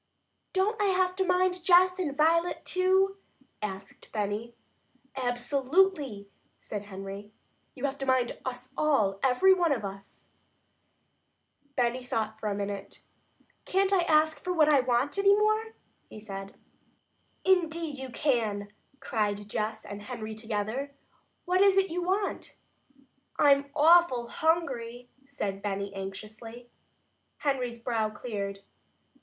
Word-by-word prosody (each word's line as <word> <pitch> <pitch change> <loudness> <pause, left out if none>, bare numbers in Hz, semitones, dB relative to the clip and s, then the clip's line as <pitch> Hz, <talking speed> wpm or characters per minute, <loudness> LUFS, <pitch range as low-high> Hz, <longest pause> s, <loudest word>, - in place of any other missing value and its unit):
"Don't 410 +3 0
I - - +3
have 370 -1 +2
to 380 - +2
mind 360 -1 +1
Jess 365 +1 +5
and 290 -6 -2
Violet 335 +3 +2
too?" 380 +1 +2 0.4
asked 195 -2 -7
Benny. 215 +2 -3 0.6
"Absolutely!" 265 - 0 0.3
said 205 -1 -6
Henry. 195 +1 -8 0.4
"You 265 +1 -3
have 280 0 -3
to 270 - -4
mind 255 -2 +2
us 255 0 -6
all, 215 -11 +2
every 270 +9 +5
one 350 -4 +2
of 230 -7 -1
us!" 195 0 -10 1.5
Benny 245 0 0
thought 220 -3 -3
a 210 -2 -1
minute. 200 -1 -5 0.6
"Can't 390 +1 +2
I 375 - +4
ask 315 -1 +2
for 365 - -2
what 320 -4 +4
I 290 -2 +6
want 255 +7 0
any 400 0 +6
more?" 430 +1 +1 0.3
he - - -10
said. 195 -2 -8 0.9
"Indeed 330 -5 +1
you 265 -1 -6
can!" 225 -7 0 0.3
cried 205 -2 -2
Jess 215 +1 -3
and 205 0 -7
Henry 220 0 -6
together. 220 +5 -3 0.5
"What 365 +1 +2
is 395 -1 +5
it 390 -2 +3
you 355 +2 -2
want?" 385 +3 -2 0.8
"I'm 280 -1 +4
awful 310 -6 +5
hungry," 250 -7 -1 0.2
said 200 -8 -4
Benny 200 -1 -3
anxiously. 215 +5 -8 0.7
Henry's 255 -4 -1
brow 230 -2 -1
cleared. 200 -3 -5
255 Hz, 125 wpm, -29 LUFS, 215-345 Hz, 1.5 s, I